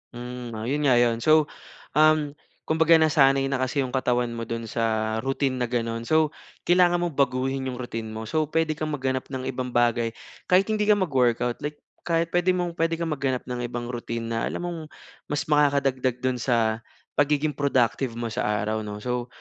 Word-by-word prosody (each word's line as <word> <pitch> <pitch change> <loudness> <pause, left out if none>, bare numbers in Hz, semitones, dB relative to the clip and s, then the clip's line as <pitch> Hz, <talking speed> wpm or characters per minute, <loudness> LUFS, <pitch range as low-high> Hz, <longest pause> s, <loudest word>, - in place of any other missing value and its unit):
Hmm, 120 -1 -7
iyon 140 +6 -1
nga 125 - +5
iyon 120 -1 +3
so, 155 +3 +4 0.4
um, 155 -1 +4 0.3
kumbaga 160 +1 +4
nasanay 140 -4 +4
na 135 - 0
kasi 130 +2 0
yung 125 - -5
katawan 125 -2 0
mo 115 -1 -5
doon 115 0 -4
sa 110 -1 -1
routine 135 0 0
na 125 - 0
ganon. 115 -1 -2
So, 155 -1 +3 0.4
kailangan 175 0 +4
mong 170 -4 -3
baguhin 135 0 0
yung 130 - -3
routine 115 -2 -5
mo 110 - -5
so, 155 +7 -1
pwede 160 0 +1
kang 155 0 -3
maghanap 130 -1 -2
ng 130 -1 -5
ibang 125 -1 -4
bagay 120 -1 +2 0.3
kahit 185 +1 +5
hindi 210 -1 0
ka 210 - +6
mag-workout 125 - +1
like 150 +1 -4 0.3
kahit 165 0 +1
pwede 175 +1 +2
mong 175 -1 -1
pwede 165 0 +2
kang 165 -1 -3
maghanap 130 -3 -1
ng 125 -1 -5
ibang 120 0 -5
routine 115 -1 -4
na 115 - -1
alam - - -4
mong 175 -1 -4 0.5
mas 145 0 -1
makakadagdag 140 -4 +1
doon 130 -1 0
sa 115 -2 +1 0.4
pagiging 150 +1 +2
productive 130 -3 0
mo 115 -1 -4
sa - - -1
araw 105 +1 0
'no. 105 -1 -6
So 125 -1 -2
130 Hz, 185 wpm, -25 LUFS, 120-155 Hz, 0.5 s, ka